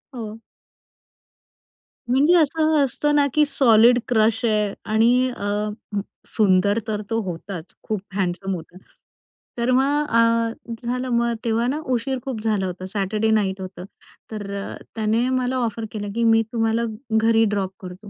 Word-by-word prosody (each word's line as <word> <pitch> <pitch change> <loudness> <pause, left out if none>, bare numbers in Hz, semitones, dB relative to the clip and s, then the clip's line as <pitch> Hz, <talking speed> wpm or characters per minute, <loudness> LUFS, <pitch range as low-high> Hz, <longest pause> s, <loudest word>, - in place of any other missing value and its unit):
हो. 220 -2 -6 1.7
म्हणजे 280 +7 +4
असं 315 0 +2
असतं 295 +3 0
ना, 290 -1 +4
की 305 -1 +4
सॉलिड 240 -3 +5
क्रश 225 -1 +2
आहे 210 -2 +1 0.2
आणि 245 +3 +4
अ, 205 +1 -1 0.6
सुंदर 200 0 +2
तर 210 -1 -2
तो 225 - 0
होताच. 180 0 -6 0.2
खूप 215 -3 -3
हँडसम 190 0 -1
होता. 170 +2 -10 0.8
तर 240 +1 +1
मग 280 +3 +2
अ, 230 0 +1
झालं, 250 +2 -2
मग 235 0 +1
तेव्हा 230 +1 +1
ना 290 +4 -1
उशीर 260 +2 -1
खूप 250 -5 -4
झाला 210 -3 0
होतं. 185 0 -5
सॅटरडे 210 +3 -1
नाईट 195 -3 +1
होतं. 185 -1 -8 0.5
तरं 200 -2 -5 0.2
त्याने 225 +2 +1
मला 255 0 0
ऑफर 225 0 -4
केलं, 205 -2 -5
की 235 - 0
मी 225 0 +5
तुम्हाला 225 0 +1 0.4
घरी 225 0 +4
ड्रॉप 195 -2 -1
करतो. 185 +2 -10
225 Hz, 145 wpm, -22 LUFS, 205-245 Hz, 1.7 s, सॉलिड